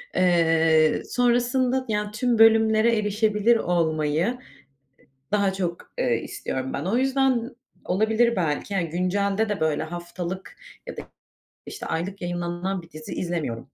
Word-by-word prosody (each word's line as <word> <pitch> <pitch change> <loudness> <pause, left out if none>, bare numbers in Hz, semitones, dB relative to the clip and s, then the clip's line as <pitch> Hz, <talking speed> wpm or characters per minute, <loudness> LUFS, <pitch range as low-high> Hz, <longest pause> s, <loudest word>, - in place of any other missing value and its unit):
eee, 165 -3 +3
sonrasında 245 +1 +1
yani 210 -1 -1
tüm 230 +1 0
bölümlere 225 0 +5
erişebilir 210 +2 +2
olmayı 165 +4 0 1.0
daha 200 -2 +2
çok, 175 -3 -4
eee, 120 -1 +2
istiyorum 130 0 -4
ben. 145 - -3
O 205 +6 0
yüzden 260 -2 +1 0.3
olabilir 220 +5 +2
belki 170 +3 -1
yani 170 -4 0
güncelde 200 +4 0
de 205 -4 -2
böyle 160 -1 +1
haftalık 175 +2 -6 0.3
ya - - -7
da - - -6 0.6
işte - - -7
aylık 185 +5 -4
yayınlanan 175 +1 -3
bir 165 - -17
dizi 155 0 -9
izlemiyorum. 155 -10 -3
195 Hz, 125 wpm, -24 LUFS, 170-225 Hz, 1.0 s, bölümlere